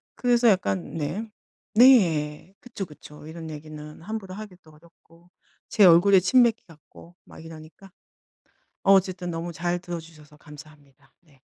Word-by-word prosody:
그래서 245 -1 +2
약간 100 - 0
네. 165 +9 -4 0.4
네. 185 - +3
그쵸, 230 -6 -7
그쵸. 150 -1 -14
이런 160 0 -9
얘기는 150 0 -10
함부로 200 -1 -7
하기도 185 -6 -12
어렵고. 165 +2 -23 0.4
제 210 - +3
얼굴에 185 +2 +6
침 250 +7 +4
뱉기 230 -1 0
같고 165 +2 -18
막 - - -14
이러니까. 165 +4 -13 0.9
어 195 - +4
어쨌든 185 -2 0
너무 165 +1 -5
잘 175 +3 -2
들어주셔서 165 -4 -10
감사합니다. 145 -3 -17
네. 145 -6 -27
170 Hz, 295 characters per minute, -24 LUFS, 155-195 Hz, 0.9 s, 얼굴에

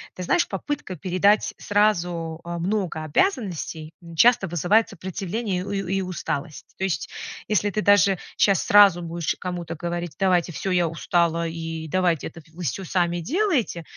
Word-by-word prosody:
Ты 180 - -5
знаешь, 340 - +2
попытка 290 -10 -4
передать 190 +4 +2
сразу, 175 -6 0
э, 170 0 -5
много 180 -3 -2
обязанностей 165 - -1 0.2
часто 230 +2 +5
вызывает 185 +7 +2
сопротивление 190 +1 -3
у - - -6
ю 195 -2 -2
и 195 +2 0
усталость. 170 -4 -5
То - - -4
есть, 190 -3 -1 0.4
если 210 -1 +1
ты 210 +2 -1
даже 200 -2 +4 0.2
щас 195 -3 +3
сразу 200 -4 +6
будешь 170 -1 -2
кому-то 175 -2 -5
говорить: 170 -1 -4
"Давайте 180 -2 +2
всё, 190 +4 -3
я 175 -2 +2
устала, 170 +1 0
и 165 -1 -5
давайте 175 -1 +1
это 170 - -11
в 160 - -22
всё 175 +2 -3
сами 175 -1 0
делайте". 280 - 0
180 Hz, 155 wpm, -24 LUFS, 170-200 Hz, 0.4 s, сразу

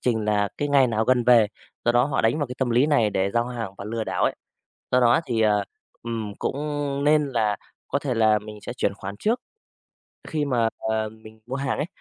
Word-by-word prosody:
trình 110 -4 0
là 105 -1 +1
cái 145 - -1
ngày 140 -2 +5
nào 110 -1 0
gần 125 0 +3
về. 120 -3 +6 0.4
Do 120 - +3
đó 120 +1 +4
họ 140 -1 0
đánh 115 +7 +2
vào 145 - 0
cái 125 - -7
tâm 130 -2 0
lý 125 +5 +4
này 120 -9 +3
để 95 0 0
giao 120 +2 +1
hàng 115 -5 -4
và 100 - -6
lừa 110 +1 -3
đảo - - 0
ấy. - - +1 0.6
Do 125 - +5
đó 120 -1 +5
thì, 115 -2 0
à, 105 -2 +3 0.4
ừm, 115 -3 -4
cũng - - -2 0.5
nên 150 0 +4
là 110 -5 +1 0.3
có 140 - 0
thể 140 -3 -2
là 110 -2 +4
mình 105 0 -10
sẽ - - -6
chuyển 125 - 0
khoản 100 0 -7
trước. 230 +4 +1 0.9
Khi 155 -2 -1
mà, 120 -5 +2 0.2
à, 110 -1 0
mình 110 0 -15
mua 130 - -3
hàng 135 0 -2
ấy, 150 - -1
115 Hz, 230 wpm, -24 LUFS, 110-130 Hz, 0.9 s, về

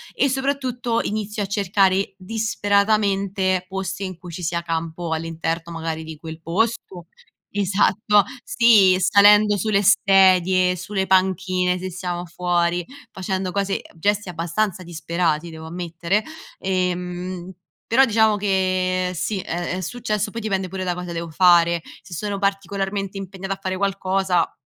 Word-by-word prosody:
e 280 - +3
soprattutto 260 -3 -1
inizio 210 0 -3
a - - -2
cercare 195 -1 +1
disperatamente 200 -2 +1
posti 190 0 -4
in 185 -2 -5
cui 175 0 -10
ci 170 - -7
sia 170 0 -2
campo 165 0 -3
all'interno 165 +1 -3
magari 165 -1 -4
di 160 0 -9
quel 160 +1 -9
posto. 185 0 -2 0.5
Esatto, 205 +1 +2 0.2
sì, 225 - +5
salendo 205 +2 +6
sulle 200 0 +1
sedie, 185 -2 +4
sulle 190 +2 -2
panchine, 185 -1 +2
se 185 +1 -5
siamo 175 0 -4
fuori, 175 0 0 0.3
facendo 190 0 -3
cose 200 0 -1 0.2
gesti 205 +4 0
abbastanza 175 +3 -2
disperati 170 -1 -2
devo 160 0 -9
ammettere, 175 +4 -2 0.3
ehm, 180 -1 -3 0.3
però 265 +4 +5
diciamo 220 -2 +3
che 185 -2 0
sì, 195 +4 -2
è 175 0 -3
è - - -4
successo, 215 +1 -2
poi 230 - -5
dipende 195 -3 -1
pure 190 +1 -5
da 180 -1 -1
cosa 180 -1 -6
devo 170 0 -4
fare. 170 0 +4 0.2
Se 175 +2 -12
sono 205 +3 -3
particolarmente 195 0 -2
impegnata 195 0 -5
a 195 - -10
fare 190 -1 -2
qualcosa 190 -2 0
185 Hz, 135 wpm, -22 LUFS, 175-200 Hz, 0.5 s, salendo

